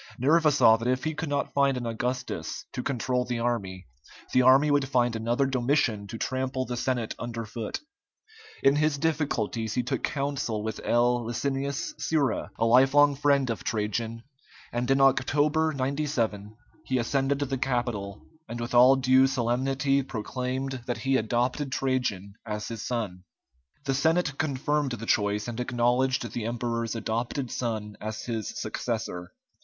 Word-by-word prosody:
Nerva 155 +4 +4
saw 115 -6 +6
that 115 +1 -4
if 130 +1 +1
he 155 - -1
could 155 0 -4
not 140 -1 -1
find 140 -2 +3
an 120 - -4
Augustus 125 +2 -3
to 125 - -3
control 125 -1 -1
the 125 -1 -3
army, 100 -6 -2 0.5
the 130 - +5
army 135 +4 +6
would 140 -2 +2
find 120 -3 +2
another 120 +4 +1
Domitian 125 -5 +1
to 115 - -6
trample 130 +1 -2
the 125 - -4
Senate 120 -2 -1
under 115 -1 -4
foot. 115 - -5 0.8
In 135 +1 +5
his 150 -1 +2
difficulties 135 -8 -1
he 125 - +1
took 125 - -2
counsel 140 -6 -2
with 110 0 -4
L. 120 0 +2
Licinius 140 - -2
Sura, 145 -8 0
a 115 - +1
lifelong 135 +5 +5
friend 140 -3 +2
of 115 - -5
Trajan, 110 +2 -2 0.5
and 120 +1 -1
in 135 0 +4
October, 145 +4 +3
97, 130 -7 -2 0.3
he 130 - 0
ascended 135 +3 +1
the 135 -1 -2
Capitol, 120 -6 -2 0.2
and 120 +1 -5
with 120 +1 -4
all 125 +2 +7
due 130 0 +4
solemnity 135 +3 +1
proclaimed 130 +2 -4
that 120 - -1
he 135 0 0
adopted 125 +4 0
Trajan 125 -8 -1
as 105 -2 -4
his 115 -2 -5
son. 105 -7 -3 0.6
The 135 - +1
Senate 160 +1 +1
confirmed 145 -1 0
the 115 -1 -5
choice, 105 -1 +1
and 120 0 -5
acknowledged 125 +1 +1
the 115 - -3
emperor's 115 -1 -2
adopted 120 +3 -2
son 110 -3 -3
as 110 +1 -5
his 115 -3 -3
successor. 90 0 -4
125 Hz, 155 wpm, -27 LUFS, 115-135 Hz, 0.8 s, all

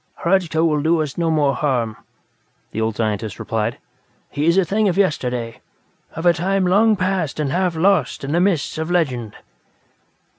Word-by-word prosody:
"Hradzka 170 -3 +2
will 150 -3 +1
do 165 +2 +2
us 145 -3 -6
no 170 -1 0
more 150 -3 +2
harm," 125 -7 -1 0.8
the 110 - -3
old 110 -1 -1
scientist 110 -2 -2
replied. 115 +1 -2 0.5
"He 150 +2 -1
is 170 +2 +4
a 190 - +4
thing 210 +4 +1
of 180 - -2
yesterday; 125 -11 -1 0.5
of 165 - -5
a 175 - +6
time 190 +3 0
long 210 +4 +4
past 185 -6 -1
and 145 -3 -1
half 180 0 0
lost 160 -6 +1
in 135 - -3
the 170 +2 +2
mists 180 -5 0
of 160 +1 -3
legend." 130 -11 -1
160 Hz, 175 wpm, -20 LUFS, 130-180 Hz, 0.8 s, a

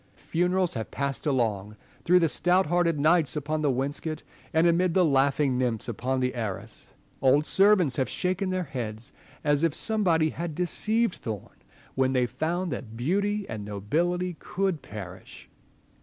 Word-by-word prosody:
Funerals 180 +1 0
have 110 - -4
passed 140 +3 -3
along 105 -7 0 0.3
through 180 +2 +5
the 170 -2 +4
stout 180 +4 +2
hearted 170 -1 +1
knights 155 -2 +3
upon 155 +1 -2
the 150 - +2
wainscot, 145 +4 -2 0.3
and 160 +1 +3
amid 175 0 +2
the 185 -2 +5
laughing 135 -2 +2
nymphs 120 -3 -1
upon 125 +3 -2
the 125 0 0
arras. 110 -6 -5 0.3
Old 135 +3 +4
servants 190 -8 +4
have 130 -3 0
shaken 185 +1 -1
their 185 0 -1
heads, 120 -7 -5 0.3
as 145 -1 +2
if 165 -2 +1
some 220 -1 0
body 160 -4 +3
had 170 -2 -5
deceived 215 +5 +1
thorn, 110 -5 -7 0.4
when 130 0 +1
they 125 -1 +2
found 170 +7 -2
that 115 -3 -6
beauty 200 - 0
and 110 -2 -5
nobility 170 - -1
could 190 -5 -2
perish. 95 -3 -10
155 Hz, 155 wpm, -27 LUFS, 125-180 Hz, 0.4 s, through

